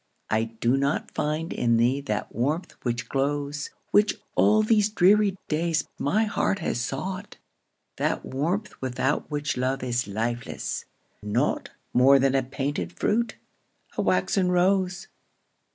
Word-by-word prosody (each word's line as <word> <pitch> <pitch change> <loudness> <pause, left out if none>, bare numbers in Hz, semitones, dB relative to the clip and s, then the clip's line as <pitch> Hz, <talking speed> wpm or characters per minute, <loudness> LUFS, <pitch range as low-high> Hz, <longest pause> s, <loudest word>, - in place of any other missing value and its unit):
I 110 +1 +2
do 115 +3 0
not 140 +1 0
find 155 +2 -2
in 115 -1 +2
thee 125 +4 +2
that 105 -6 -3
warmth 145 - -1
which 120 -2 -2
glows, 145 +2 -1 0.2
Which, 210 +1 +4 0.2
all 215 +1 +4
these 215 -1 +3
dreary 205 0 +4
days, 160 0 0
my 205 +10 +2
heart 205 -2 0
has 160 -9 -2
sought, 185 - -4 0.6
That - - -1
warmth 170 +11 -2
without 130 +2 -1
which 145 -4 -2
love 130 +1 -1
is 120 -2 -1
lifeless, 115 +4 -3 0.4
naught 105 0 0 0.2
More 135 +3 +7
than 135 0 +2
a 135 - +3
painted 130 - -3
fruit, 220 - 0 0.6
a - - 0
waxen 185 -2 +2
rose. 185 0 +2
145 Hz, 135 wpm, -26 LUFS, 125-185 Hz, 0.6 s, More